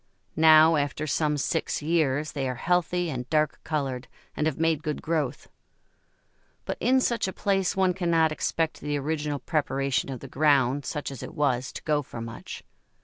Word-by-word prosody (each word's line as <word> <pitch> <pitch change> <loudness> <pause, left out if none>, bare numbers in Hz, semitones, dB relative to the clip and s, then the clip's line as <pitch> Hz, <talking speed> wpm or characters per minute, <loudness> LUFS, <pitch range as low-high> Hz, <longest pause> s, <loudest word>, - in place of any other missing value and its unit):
Now, 160 0 +7
after 145 +1 -1
some 150 0 0
six 155 +1 -1
years, 155 -2 +1
they 135 -4 -2
are 125 - -3
healthy 180 +3 0
and 125 -2 -5
dark 155 0 +1
coloured, 135 -5 -3 0.3
and 155 - 0
have 155 - -2
made 160 -2 +1
good 150 -1 -3
growth. 150 -5 -2 1.2
But - - -3
in 260 +1 +3
such 235 -5 0
a - - -2
place 195 -2 0
one 190 -1 +2
cannot 170 -3 +2
expect 160 +1 -1
the 145 0 -1
original 150 0 -2
preparation 140 -2 -1
of 130 -2 -5
the 135 - -9
ground, 140 -1 +2
such 150 -2 -4
as 135 - -8
it - - -8
was, 130 -4 0
to - - -8
go 150 -1 +1
for 130 - -9
much. 115 0 -8
150 Hz, 175 wpm, -26 LUFS, 135-165 Hz, 1.2 s, Now